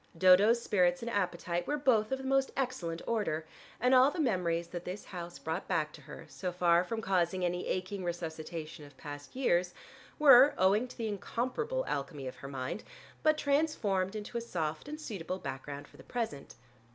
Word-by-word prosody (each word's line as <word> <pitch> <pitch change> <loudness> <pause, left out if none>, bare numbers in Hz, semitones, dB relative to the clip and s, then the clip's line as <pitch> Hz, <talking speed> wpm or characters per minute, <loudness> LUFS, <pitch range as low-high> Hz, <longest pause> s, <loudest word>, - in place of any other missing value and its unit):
Dodo's 190 +6 +6
spirits 180 -4 +2
and 235 - -3
appetite 175 -3 -1
were 295 - 0
both 235 -6 +2
of 265 - +1
the 265 - -8
most 270 0 +2
excellent 190 -11 -2
order, 200 -9 -1 0.3
and 250 +2 +3
all 260 +1 +7
the 330 - -6
memories 175 - 0
that 175 -1 -6
this 185 +4 -6
house 175 -2 -7
brought 160 +3 -4
back 155 -1 0
to - - -12
her, - - -10
so 180 -2 -4
far 175 -1 +3
from 225 +4 -3
causing 185 -1 +1
any 180 0 -2
aching 185 +1 -2
resuscitation 165 -2 -5
of 145 -2 -15
past 145 - -9
years, 180 -9 +1 0.4
were, 275 -1 +8
owing 200 +6 +3
to - - -13
the 230 -2 -2
incomparable 260 - -2
alchemy 140 0 -3
of 130 - -6
her 140 - -8
mind, 135 +7 -4 0.4
but 310 0 +4
transformed 255 -11 +1
into 215 +3 -4
a - - -6
soft 160 - -3
and 305 +1 -6
suitable 190 - -4
background 140 -1 -6
for - - -19
the - - -13
present. 220 - -4
185 Hz, 185 wpm, -32 LUFS, 170-240 Hz, 0.4 s, were